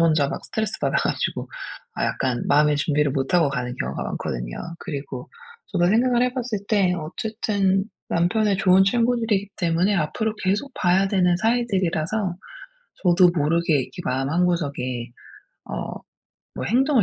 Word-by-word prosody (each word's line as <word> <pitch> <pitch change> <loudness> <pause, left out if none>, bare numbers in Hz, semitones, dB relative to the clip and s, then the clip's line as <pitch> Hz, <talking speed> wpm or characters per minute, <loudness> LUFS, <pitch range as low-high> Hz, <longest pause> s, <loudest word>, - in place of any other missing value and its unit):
혼자 155 -4 +3
막 - - -5
스트레스 220 -1 -2
받아 - - +1
가지고 - - -1 0.5
아 - - -1
약간 130 -3 -1
마음의 150 +1 +4
준비를 145 -1 +1
못 135 +3 -2
하고 165 -5 +5
가는 125 -2 -3
경우가 - - -3
많거든요. - - -4 0.2
그리고 140 -4 -6 0.4
저도 175 -2 +1
생각을 240 +4 +3
해 250 - +1
봤을 240 -4 -2
때 195 -4 +3
어쨌든 195 +3 -1 0.2
남편의 200 +4 +2
좋은 190 -1 +5
친구들이기 225 -2 +1
때문에 175 +3 +1
앞으로 215 +7 -1
계속 205 +9 0
봐야 185 +2 +3
되는 180 -3 +3
사이들이라서 195 -4 0 0.7
저도 180 0 +6
모르게 165 +3 +2
이렇게 175 - -8
마음 135 -2 -1
한구석에 140 -8 -1 0.5
어 - - -5 0.6
뭐 - - -3
'행동을 260 +2 +3
180 Hz, 335 characters per minute, -23 LUFS, 150-215 Hz, 0.7 s, 저도